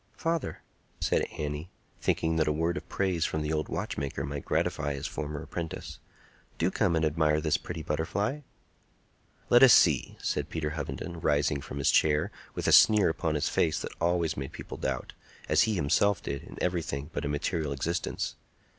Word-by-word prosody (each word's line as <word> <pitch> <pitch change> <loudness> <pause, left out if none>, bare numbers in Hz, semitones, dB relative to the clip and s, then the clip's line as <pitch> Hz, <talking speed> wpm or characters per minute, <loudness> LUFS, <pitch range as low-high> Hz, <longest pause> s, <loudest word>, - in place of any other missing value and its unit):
"Father," 165 -2 -2 0.4
said - - +1
Annie, 75 +3 -4 0.3
thinking 80 0 +1
that 80 - +2
a - - +3
word 80 +3 0
of 90 - -7
praise 95 -4 0
from 80 -1 -1
the 75 +1 -1
old 75 0 -1
watchmaker 70 -1 -3
might 70 0 -5
gratify 75 -2 0
his 70 - -5
former 75 -1 -4
apprentice, 85 -2 -6 0.6
"do 85 +3 +1
come 95 -5 +1
and 80 0 +2
admire 75 0 +2
this 75 0 +1
pretty 80 - -6
butterfly." 95 - -1 1.1
"Let 120 - +7
us 130 -4 +9
see," 75 -7 +4
said - - -2
Peter 75 -2 -2
Hovenden, 80 +3 -5
rising 75 -1 +1
from 70 - -7
his 70 - +3
chair, 75 0 +3 0.2
with - - -2
a - - +4
sneer 105 -4 +7
upon 80 -1 -1
his 75 - 0
face 80 - +1
that - - -5
always 85 -2 +1
made 70 +2 -5
people - - -8
doubt, 65 -2 -3 0.3
as - - +4
he 110 - +1
himself 95 +6 +2
did, 70 -1 -3
in - - -12
everything 80 -4 -2
but - - -3
a - - -1
material 75 +1 -1
existence. 85 +6 -2
80 Hz, 180 wpm, -29 LUFS, 75-85 Hz, 1.1 s, us